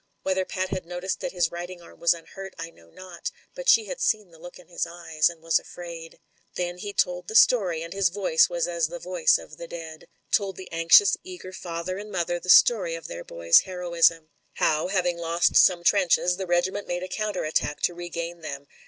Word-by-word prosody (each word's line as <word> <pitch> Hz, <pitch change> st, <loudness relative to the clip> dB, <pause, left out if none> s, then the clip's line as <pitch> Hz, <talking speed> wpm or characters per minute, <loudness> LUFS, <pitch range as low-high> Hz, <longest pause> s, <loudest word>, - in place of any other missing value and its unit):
Whether 190 Hz, 0 st, 0 dB
Pat 185 Hz, 0 st, -3 dB
had 185 Hz, -2 st, -4 dB
noticed 180 Hz, +2 st, -4 dB
that -, -, -4 dB
his 175 Hz, -3 st, 0 dB
writing 175 Hz, +1 st, -7 dB
arm 170 Hz, -, -16 dB
was 170 Hz, 0 st, +3 dB
unhurt, 195 Hz, +3 st, -10 dB
I 165 Hz, 0 st, -7 dB
know 85 Hz, -, -21 dB
not; 185 Hz, -, -8 dB, 0.2 s
but -, -, -2 dB
she 450 Hz, -1 st, +6 dB
had -, -, -7 dB
seen 210 Hz, -5 st, 0 dB
the 165 Hz, -, -18 dB
look 175 Hz, +2 st, -11 dB
in 180 Hz, -, -17 dB
his 175 Hz, -1 st, -3 dB
eyes, 170 Hz, -2 st, 0 dB
and 165 Hz, -2 st, -13 dB
was 165 Hz, 0 st, +3 dB
afraid. 170 Hz, -2 st, -10 dB, 0.4 s
Then 175 Hz, 0 st, -3 dB
he 205 Hz, +2 st, -5 dB
told 180 Hz, -2 st, -1 dB
the 220 Hz, -, -6 dB
story, 185 Hz, -10 st, +4 dB
and 170 Hz, -, -8 dB
his 195 Hz, -2 st, +2 dB
voice 185 Hz, -4 st, +2 dB
was 175 Hz, -1 st, -1 dB
as 170 Hz, -2 st, 0 dB
the 175 Hz, +2 st, -7 dB
voice 180 Hz, -1 st, +2 dB
of 155 Hz, -, -13 dB
the 170 Hz, -, -8 dB
dead. 160 Hz, -2 st, -9 dB, 0.2 s
Told 195 Hz, -2 st, +1 dB
the 185 Hz, -, -11 dB
anxious, 165 Hz, -, +5 dB
eager 360 Hz, -, -10 dB
father 180 Hz, +1 st, -5 dB
and 210 Hz, +1 st, -8 dB
mother 175 Hz, -2 st, -2 dB
the 180 Hz, -, -10 dB
story 180 Hz, -4 st, +5 dB
of 165 Hz, -, -9 dB
their 85 Hz, 0 st, -7 dB
boy's 85 Hz, 0 st, +4 dB
heroism. 170 Hz, -3 st, +1 dB, 0.2 s
How, 155 Hz, +1 st, +1 dB
having 180 Hz, -2 st, 0 dB
lost 170 Hz, +1 st, +1 dB
some 175 Hz, -2 st, +5 dB
trenches, 180 Hz, -2 st, +3 dB
the 190 Hz, -1 st, -5 dB
regiment 180 Hz, +3 st, 0 dB
made 175 Hz, +1 st, -3 dB
a -, -, -4 dB
counter 210 Hz, -1 st, -3 dB
attack 155 Hz, -1 st, -1 dB
to 175 Hz, -, +2 dB
regain 170 Hz, 0 st, -6 dB
them. 140 Hz, -3 st, -7 dB
175 Hz, 215 wpm, -25 LUFS, 165-185 Hz, 0.4 s, she